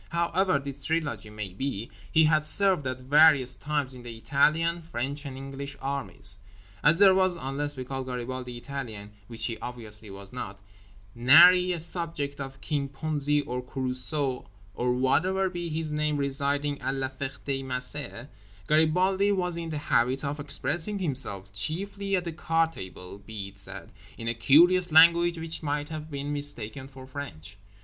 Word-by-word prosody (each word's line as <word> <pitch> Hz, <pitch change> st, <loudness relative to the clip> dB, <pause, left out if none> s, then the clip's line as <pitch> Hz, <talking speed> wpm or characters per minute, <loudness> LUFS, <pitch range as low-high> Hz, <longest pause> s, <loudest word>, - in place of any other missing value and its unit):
However 170 Hz, +2 st, +1 dB
this 140 Hz, 0 st, -5 dB
trilogy 145 Hz, -10 st, -1 dB
may 105 Hz, -3 st, -6 dB
be, 115 Hz, 0 st, -4 dB, 0.2 s
he 160 Hz, -, +5 dB
had 155 Hz, -1 st, +3 dB
served 185 Hz, -3 st, +2 dB
at 130 Hz, 0 st, -4 dB
various 140 Hz, -2 st, +5 dB
times 145 Hz, -3 st, -2 dB
in 125 Hz, -, -8 dB
the 120 Hz, -2 st, -8 dB
Italian, 160 Hz, +7 st, +2 dB
French 140 Hz, -1 st, -4 dB
and 130 Hz, -1 st, -7 dB
English 135 Hz, +1 st, -6 dB
armies. 135 Hz, -7 st, -2 dB, 0.4 s
As 155 Hz, +3 st, +5 dB
there 195 Hz, 0 st, +7 dB
was 185 Hz, -1 st, +3 dB
(unless 140 Hz, +1 st, -4 dB
we 130 Hz, -, -3 dB
call 135 Hz, +1 st, -4 dB
Garibaldi 125 Hz, 0 st, -5 dB
Italian, 120 Hz, -6 st, -6 dB, 0.2 s
which 115 Hz, -2 st, -1 dB
he 115 Hz, -, -2 dB
obviously 110 Hz, -3 st, -7 dB
was 100 Hz, +1 st, -9 dB
not) 100 Hz, -5 st, -6 dB, 0.5 s
nary 175 Hz, +9 st, +7 dB
a 175 Hz, -, -2 dB
subject 160 Hz, -4 st, -3 dB
of 135 Hz, 0 st, -7 dB
King 145 Hz, -3 st, -2 dB
Ponzi 150 Hz, -1 st, 0 dB
or 125 Hz, +1 st, -3 dB
Carruso 130 Hz, 0 st, -2 dB, 0.3 s
or 125 Hz, +3 st, 0 dB
whatever 180 Hz, +10 st, +2 dB
be 175 Hz, -1 st, -4 dB
his 155 Hz, 0 st, -3 dB
name 150 Hz, 0 st, 0 dB
residing 140 Hz, +1 st, -1 dB
at 135 Hz, -, -1 dB
La 135 Hz, -1 st, -2 dB
Ferté 135 Hz, 0 st, -4 dB
Macé, 125 Hz, 0 st, -3 dB, 0.4 s
Garibaldi 180 Hz, +6 st, +3 dB
was 180 Hz, -3 st, 0 dB
in 170 Hz, -1 st, -4 dB
the 155 Hz, -, -3 dB
habit 130 Hz, -1 st, +1 dB
of 145 Hz, +2 st, -3 dB
expressing 150 Hz, +7 st, -1 dB
himself—chiefly 155 Hz, -, -1 dB
at 180 Hz, -, 0 dB
the 170 Hz, -2 st, -4 dB
card 165 Hz, +1 st, +1 dB
table, 95 Hz, -, -8 dB
be 100 Hz, -1 st, -7 dB
it 100 Hz, 0 st, -11 dB
said—in 115 Hz, +3 st, -7 dB
a 115 Hz, -, +1 dB
curious 170 Hz, +9 st, +5 dB
language 170 Hz, +2 st, +6 dB
which 160 Hz, 0 st, -5 dB
might 145 Hz, -1 st, -2 dB
have 155 Hz, -1 st, -6 dB
been 145 Hz, 0 st, -4 dB
mistaken 135 Hz, -3 st, -3 dB
for 135 Hz, -1 st, -12 dB
French. 100 Hz, -, -8 dB
140 Hz, 160 wpm, -27 LUFS, 125-160 Hz, 0.5 s, there